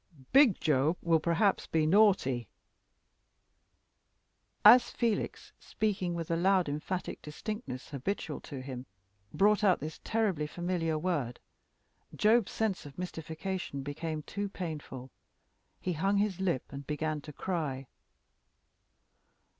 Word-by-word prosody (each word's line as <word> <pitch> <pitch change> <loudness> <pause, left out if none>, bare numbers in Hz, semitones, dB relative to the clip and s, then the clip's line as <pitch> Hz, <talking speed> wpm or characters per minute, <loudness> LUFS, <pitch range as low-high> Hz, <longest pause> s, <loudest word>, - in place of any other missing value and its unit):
Big 265 -7 +6
Job 150 +3 +2
will 165 -1 +4
perhaps 170 +5 +1
be 160 -1 +1
naughty 155 - +3 1.5
" 215 - +3
As 250 - 0
Felix, 230 -3 -2
speaking 190 -5 -1
with 165 -2 -4
the 165 - +2
loud 185 +1 +3
emphatic 150 +6 -4
distinctness 150 - -6
habitual 150 +3 -3
to 135 -2 -7
him, 130 -1 -7 0.4
brought 210 +2 +3
out 190 -3 +4
this 155 +1 -6
terribly 200 -9 0
familiar 175 -1 -1
word, 150 -8 -2 0.8
Job's 220 -1 +3
sense 215 -4 -1
of 140 - -14
mystification 165 -3 -4
became 155 +2 -4
too 205 +4 -4
painful: 150 -8 -6 0.7
he 180 - -2
hung 195 +6 +1
his 200 -2 0
lip 175 -9 0
and 140 0 -8
began 155 0 -2
to 150 - -9
cry. 150 -5 -3
170 Hz, 120 wpm, -31 LUFS, 150-195 Hz, 1.5 s, Big